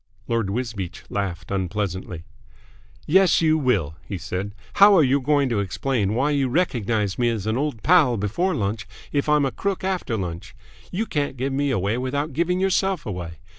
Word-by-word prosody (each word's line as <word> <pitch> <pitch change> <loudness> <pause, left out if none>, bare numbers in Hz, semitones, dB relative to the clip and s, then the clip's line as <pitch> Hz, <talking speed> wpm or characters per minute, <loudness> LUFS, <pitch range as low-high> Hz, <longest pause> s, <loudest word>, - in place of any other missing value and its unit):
Lord 115 -4 0
Wisbeach 105 -5 -4
laughed 95 -3 -3
unpleasantly. 95 -3 -3 0.8
"Yes, 190 +2 +4
you 160 -1 +3
will," 105 - 0
he 100 - -4
said. 95 +3 -5 0.3
"How 200 -1 +9
are 160 - +6
you 135 +1 +2
going 145 0 +2
to 115 -4 0
explain 105 +1 -1
why 140 +5 +1
you 140 -3 +1
recognised 120 - 0
me 120 -1 +3
as 110 -4 -3
an 110 +1 0
old 135 -4 -2
pal 155 -9 +5
before 145 - 0
lunch 100 0 -2 0.2
if 145 +1 0
I'm 150 -1 +4
a 135 - -1
crook 195 -2 -3
after 185 -11 -1
lunch. 85 -4 -6 0.4
You 215 +5 -1
can't 145 -7 -2
give 135 +2 -2
me 140 +1 0
away 110 -1 0
without 140 +3 -2
giving 170 +5 0
yourself 190 -2 +1
away. 90 -5 -5
125 Hz, 175 wpm, -23 LUFS, 100-150 Hz, 0.8 s, How